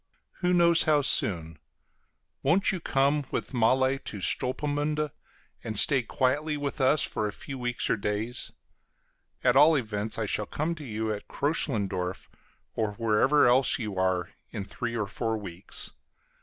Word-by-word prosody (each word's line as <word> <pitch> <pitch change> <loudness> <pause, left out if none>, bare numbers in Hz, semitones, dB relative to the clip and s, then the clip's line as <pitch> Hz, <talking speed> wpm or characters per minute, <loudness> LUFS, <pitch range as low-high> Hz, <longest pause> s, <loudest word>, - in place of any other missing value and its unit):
Who 180 -1 +1
knows 170 -1 +4
how 150 -2 +3
soon? 80 - +1 0.8
Won't 190 +5 +3
you 190 - -3
come 140 -1 +1
with - - -4
Malle 130 +3 +2
to 105 - -7
Stolpmünde, 145 +7 -1 0.5
and 110 -2 -4
stay 135 +4 +4
quietly 145 +6 0
with 145 0 -3
us 135 +3 +4
for 110 - -1
a - - -4
few 135 +4 -8
weeks 120 0 -2
or - - +1
days? 105 +4 -3 0.9
At 125 0 +4
all 150 +4 +7
events 110 -4 -2
I 110 - -1
shall 105 0 -1
come 155 +3 -2
to 155 -3 -9
you 110 -3 -2
at 105 - -8
Kröchlendorf, 100 - -1 0.4
or 110 -2 -1
wherever 115 +6 +3
else 125 +2 +4
you 105 -6 -4
are, 90 -1 0 0.2
in 100 -4 -5
three 120 +2 -4
or 105 - 0
four 110 +2 -2
weeks. 95 -4 -5
125 Hz, 155 wpm, -28 LUFS, 105-145 Hz, 0.9 s, all